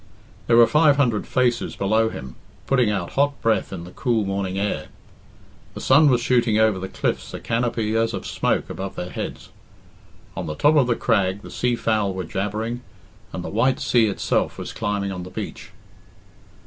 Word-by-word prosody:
There 115 Hz, -, +5 dB
were 120 Hz, -, +9 dB
five 150 Hz, +2 st, +4 dB
hundred 120 Hz, -7 st, +1 dB
faces 120 Hz, -2 st, 0 dB
below 110 Hz, +3 st, +2 dB
him, 65 Hz, -10 st, -8 dB, 0.3 s
putting 125 Hz, -5 st, +2 dB
out 95 Hz, -4 st, -2 dB
hot 140 Hz, 0 st, +1 dB
breath 110 Hz, -4 st, +1 dB
in 90 Hz, -3 st, -6 dB
the 90 Hz, -, -10 dB
cool 115 Hz, -1 st, 0 dB
morning 95 Hz, -1 st, -2 dB
air. 100 Hz, +1 st, -2 dB, 0.9 s
The -, -, -6 dB
sun 145 Hz, +3 st, +5 dB
was 125 Hz, -2 st, +3 dB
shooting 120 Hz, -3 st, +2 dB
over 110 Hz, -3 st, +3 dB
the 95 Hz, -, -4 dB
cliffs -, -, -3 dB
a -, -, -5 dB
canopy 115 Hz, -2 st, -1 dB
as 115 Hz, 0 st, +2 dB
of -, -, -6 dB
smoke -, -, 0 dB
above 95 Hz, 0 st, -5 dB
their 90 Hz, -, -5 dB
heads. -, -, -6 dB, 0.9 s
On -, -, -4 dB
the 75 Hz, -, -4 dB
top 150 Hz, -, +4 dB
of 140 Hz, -5 st, +4 dB
the 120 Hz, -, +2 dB
crag 100 Hz, -4 st, 0 dB
the -, -, -10 dB
sea 125 Hz, -1 st, 0 dB
fowl 105 Hz, -4 st, 0 dB
were 95 Hz, -, -3 dB
jabbering, 105 Hz, +7 st, -3 dB, 0.5 s
and -, -, -5 dB
the -, -, -5 dB
white 130 Hz, +2 st, +1 dB
sea 120 Hz, -5 st, +3 dB
itself 100 Hz, -, -1 dB
was -, -, -6 dB
climbing 105 Hz, -3 st, -2 dB
on 90 Hz, -1 st, -5 dB
the 90 Hz, -, -8 dB
beach. -, -, -7 dB
110 Hz, 185 wpm, -23 LUFS, 100-120 Hz, 0.9 s, were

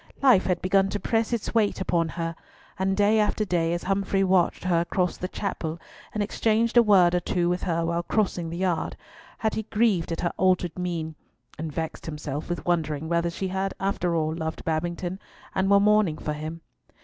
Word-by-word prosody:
Life 250 Hz, -9 st, +5 dB
had 180 Hz, -2 st, 0 dB
begun 195 Hz, +1 st, +3 dB
to 205 Hz, -, -2 dB
press 225 Hz, +1 st, 0 dB
its 235 Hz, -3 st, -2 dB
weight 215 Hz, -3 st, +2 dB
upon 170 Hz, -3 st, 0 dB
her, 165 Hz, 0 st, -4 dB, 0.4 s
and 190 Hz, 0 st, +1 dB
day 210 Hz, +2 st, +4 dB
after 215 Hz, 0 st, +1 dB
day, 170 Hz, -3 st, +1 dB
as 175 Hz, 0 st, -2 dB
Humfrey 195 Hz, 0 st, +1 dB
watched 185 Hz, -2 st, +2 dB
her 175 Hz, -2 st, +2 dB
across 180 Hz, +1 st, 0 dB
the 180 Hz, -, -4 dB
chapel, 170 Hz, -5 st, -4 dB, 0.3 s
and 215 Hz, -, -1 dB
exchanged 225 Hz, +3 st, +1 dB
a 240 Hz, -, +9 dB
word 190 Hz, -6 st, +5 dB
or 180 Hz, -, +3 dB
two 175 Hz, 0 st, 0 dB
with 180 Hz, 0 st, -1 dB
her 170 Hz, -1 st, 0 dB
while 170 Hz, +1 st, 0 dB
crossing 180 Hz, -3 st, -1 dB
the 170 Hz, -, -5 dB
yard, 180 Hz, -3 st, -1 dB, 0.4 s
had 220 Hz, -1 st, 0 dB
he -, -, -1 dB
grieved 210 Hz, -6 st, +1 dB
at 165 Hz, -, -2 dB
her 170 Hz, -, -1 dB
altered 180 Hz, -3 st, +2 dB
mien; 170 Hz, -3 st, -3 dB, 0.5 s
and 160 Hz, 0 st, -4 dB
vexed 160 Hz, +2 st, -5 dB
himself 150 Hz, -1 st, -5 dB
with 175 Hz, -, -3 dB
wondering 160 Hz, -3 st, -1 dB
whether 170 Hz, 0 st, +1 dB
she 185 Hz, +3 st, -4 dB
had 190 Hz, +1 st, -2 dB
after 185 Hz, -3 st, 0 dB
all 155 Hz, -1 st, 0 dB
loved 160 Hz, -1 st, -4 dB
Babington, 175 Hz, +3 st, -2 dB, 0.3 s
and 190 Hz, +1 st, +1 dB
were 200 Hz, 0 st, +6 dB
mourning 210 Hz, -6 st, +3 dB
for 150 Hz, -, -3 dB
him. 155 Hz, +2 st, -6 dB
180 Hz, 195 wpm, -26 LUFS, 165-195 Hz, 0.5 s, a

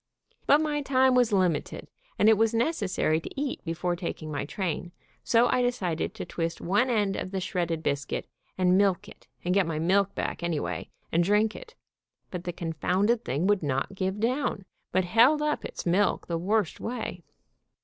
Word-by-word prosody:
But 290 Hz, +2 st, +6 dB
my 300 Hz, -1 st, 0 dB
time 260 Hz, -2 st, +3 dB
was 245 Hz, -2 st, +3 dB
limited, 185 Hz, -6 st, 0 dB, 0.3 s
and 210 Hz, -, +4 dB
it 220 Hz, -, +7 dB
was 225 Hz, +2 st, +2 dB
necessary 210 Hz, -, +1 dB
to 270 Hz, -, -7 dB
eat 285 Hz, -2 st, -3 dB
before 175 Hz, +1 st, -2 dB
taking 170 Hz, -3 st, -5 dB
my 145 Hz, -1 st, -2 dB
train, 175 Hz, 0 st, -3 dB, 0.3 s
so 235 Hz, +1 st, +4 dB
I 250 Hz, -, +2 dB
decided 195 Hz, -10 st, -1 dB
to -, -, -5 dB
twist 165 Hz, -1 st, -3 dB
one 205 Hz, +8 st, +1 dB
end 205 Hz, -5 st, +1 dB
of 185 Hz, -, -4 dB
the 190 Hz, 0 st, -3 dB
shredded 170 Hz, -3 st, -2 dB
bis 140 Hz, 0 st, 0 dB
cuit, -, -, -3 dB, 0.3 s
and 185 Hz, 0 st, +4 dB
milk 195 Hz, -3 st, +2 dB
it, -, -, -15 dB, 0.2 s
and 180 Hz, -, +1 dB
get 195 Hz, -3 st, +3 dB
my 165 Hz, -2 st, -2 dB
milk 190 Hz, +5 st, +2 dB
back -, -, -3 dB
anyway, 170 Hz, -3 st, -3 dB, 0.2 s
and 170 Hz, +1 st, +3 dB
drink 210 Hz, +4 st, +2 dB
it, -, -, -11 dB, 0.6 s
but 180 Hz, -1 st, -5 dB
the 175 Hz, -, -2 dB
confounded 185 Hz, +8 st, 0 dB
thing 145 Hz, +7 st, -1 dB
would 205 Hz, -1 st, +3 dB
not 140 Hz, +4 st, -1 dB
give 190 Hz, +1 st, -2 dB
down, 235 Hz, -3 st, -1 dB, 0.3 s
but 185 Hz, 0 st, +2 dB
held 235 Hz, +11 st, +5 dB
up 300 Hz, 0 st, -1 dB
its -, -, -6 dB
milk 190 Hz, +4 st, +2 dB
the 170 Hz, -1 st, -2 dB
worst 200 Hz, 0 st, 0 dB
way. 225 Hz, -6 st, -4 dB
190 Hz, 185 wpm, -27 LUFS, 170-230 Hz, 0.6 s, it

